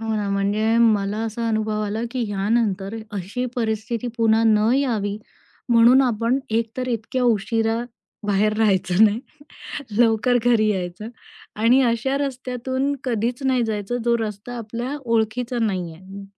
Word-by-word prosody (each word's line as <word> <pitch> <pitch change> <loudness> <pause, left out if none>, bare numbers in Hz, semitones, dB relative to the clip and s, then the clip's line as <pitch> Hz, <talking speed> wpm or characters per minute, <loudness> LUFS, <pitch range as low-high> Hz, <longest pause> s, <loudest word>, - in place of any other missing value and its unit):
हो 225 0 -2
ना. 205 -1 -2
म्हणजे 205 +3 +1
मला 210 -3 +2
असा 230 +1 -3
अनुभव 215 -1 -1
आला, 210 +2 -3
की 255 -2 -2
ह्यानंतर 200 0 0 0.2
अशी 205 +6 -3
परिस्थिती 225 0 -2
पुन्हा 225 -1 +3
न 215 0 +4
यावी 215 -7 0 0.5
म्हणून 240 +3 +6
आपण 235 +1 +1
एक 225 0 0
तर 255 0 -3
इतक्या 240 +2 -2
उशिराबाहेर 225 -2 -1
राहायचं 190 -2 +3
नाही. 215 +1 +2 0.8
लवकर 240 +1 +3
घरी 230 -3 +3
यायचं 190 +1 -3 0.5
आणि 240 +4 +5
अशा 240 +2 +1
रस्त्यातून 260 0 -2
कधीच 240 +1 -1
नाही 260 -2 +2
जायचं, 215 +1 -2
जो 235 0 +3
रस्ता 220 +2 -5
आपल्या 235 +5 -4
ओळखीचा 230 +2 0
नाही 185 -6 -1
आहे. 190 +3 -11
225 Hz, 135 wpm, -22 LUFS, 210-245 Hz, 0.8 s, म्हणून